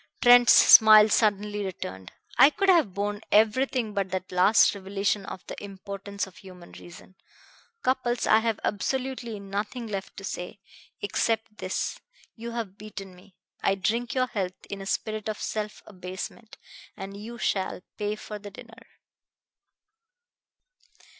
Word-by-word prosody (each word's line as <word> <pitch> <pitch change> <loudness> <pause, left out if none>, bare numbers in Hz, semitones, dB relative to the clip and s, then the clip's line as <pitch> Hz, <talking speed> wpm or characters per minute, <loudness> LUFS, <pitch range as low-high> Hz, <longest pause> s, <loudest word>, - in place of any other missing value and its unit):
Trent's 245 -1 +7
smile 215 -1 +8
suddenly 210 -1 +1
returned. 95 - -7 0.2
"I 275 - +8
could 390 +4 0
have 315 - +4
borne 205 +1 -2
everything 225 +2 +2
but 200 -2 -1
that 185 0 -4
last 185 +5 +5
revelation 200 0 -2
of 185 - -8
the - - -7
impotence 200 0 -6
of 190 - -16
human 180 -2 -13
reason. 175 +2 -13 0.7
Cupples, 250 -2 0
I 220 - +5
have 225 -2 -1
absolutely 250 0 -2
nothing 205 +5 -4
left 200 -3 -6
to 195 - -8
say, 180 0 -6 0.4
except 220 +1 -1
this: - - -3 0.4
you 235 +1 -7
have 225 -4 -6
beaten 200 -3 -9
me. 185 +1 -20 0.3
I 195 - +2
drink 230 +6 -1
your 255 -1 +2
health 190 -7 -5
in 200 -1 -5
a 195 - -7
spirit 215 +1 -2
of 215 - -4
self 210 -1 -4
abasement. 190 +3 -8 0.4
And 195 +1 -7
you 225 +4 -8
shall 190 -5 -2 0.2
pay 210 0 -1
for 210 0 -8
the 205 0 -9
dinner." 230 +4 -14
205 Hz, 140 wpm, -26 LUFS, 195-225 Hz, 0.7 s, smile